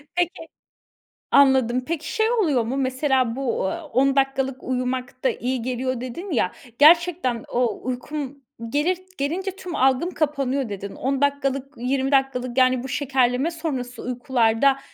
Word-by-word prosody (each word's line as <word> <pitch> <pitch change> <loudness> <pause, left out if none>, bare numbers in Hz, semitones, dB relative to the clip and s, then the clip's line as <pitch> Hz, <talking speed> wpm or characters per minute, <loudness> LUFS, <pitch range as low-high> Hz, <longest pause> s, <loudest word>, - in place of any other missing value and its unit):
Peki 345 -2 -1 0.8
Anladım. 255 -3 +4
Peki, 320 -1 -3
şey 440 +1 +2
oluyor 310 - +2
mu? 255 +5 -3
Mesela 260 -2 +1
bu, 255 -7 -1
aaa, 330 - -4
"10 275 0 +2
dakikalık 270 -1 0
uyumak 255 0 -3
da - - +4
iyi 250 0 -2
geliyor." 255 0 -2
dedin 340 +10 -6
ya, 220 -9 +1 0.3
gerçekten 325 -6 +4
o 245 -1 0
"Uykum 275 +2 -5 0.3
gelir 310 +7 +1 0.2
gelince 350 +8 -2
tüm 360 -4 -6
algım 265 +7 +2
kapanıyor." 275 -5 -1
dedin. 200 0 -6
10 270 +1 -1
dakikalık, 275 0 0
20 265 +3 -1
dakikalık, 260 -2 +1
yani, 255 -1 +4
bu - - -5
şekerleme 265 +2 +1
sonrası 265 -7 -4
uykularda, 250 +1 +2
265 Hz, 140 wpm, -23 LUFS, 250-290 Hz, 0.8 s, Anladım